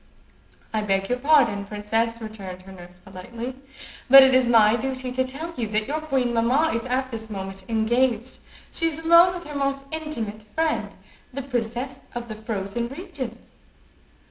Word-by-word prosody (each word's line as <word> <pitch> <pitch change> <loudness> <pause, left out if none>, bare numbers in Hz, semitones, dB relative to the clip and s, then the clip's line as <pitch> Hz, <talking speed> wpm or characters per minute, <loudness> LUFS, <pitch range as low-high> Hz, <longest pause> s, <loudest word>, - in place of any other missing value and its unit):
"I 215 - +1
beg 195 -2 0
your 250 0 0
pardon, 250 -8 +3
princess," 225 +3 -2
returned 195 -5 -8
her 190 - -12
nurse, 180 -1 -13
politely; 230 +7 -7 0.5
"but 270 +1 +11
it 265 0 +5
is 255 -1 +4
my 225 -2 +5
duty 255 +1 -3
to 260 +1 +1
tell 295 +6 -6
you 235 -3 -2
that 215 +1 -1
your 310 +2 -2
queen 265 -6 0
mamma 255 +8 +2
is 230 0 -2
at 260 +1 -1
this 220 -1 -7
moment 195 -1 -7
engaged. 235 +2 0 0.3
She 330 - +1
is 315 -2 -2
alone 340 +2 +7
with 350 - -7
her 300 -2 -9
most 275 0 -1
intimate 280 -10 -4
friend, 315 +9 -1 0.4
the 275 +1 -5
Princess 250 +1 -3 0.2
of 240 -1 -5
the 215 - -5
Frozen 215 +1 -3
Regions." 270 - -8
240 Hz, 170 wpm, -24 LUFS, 215-275 Hz, 0.5 s, but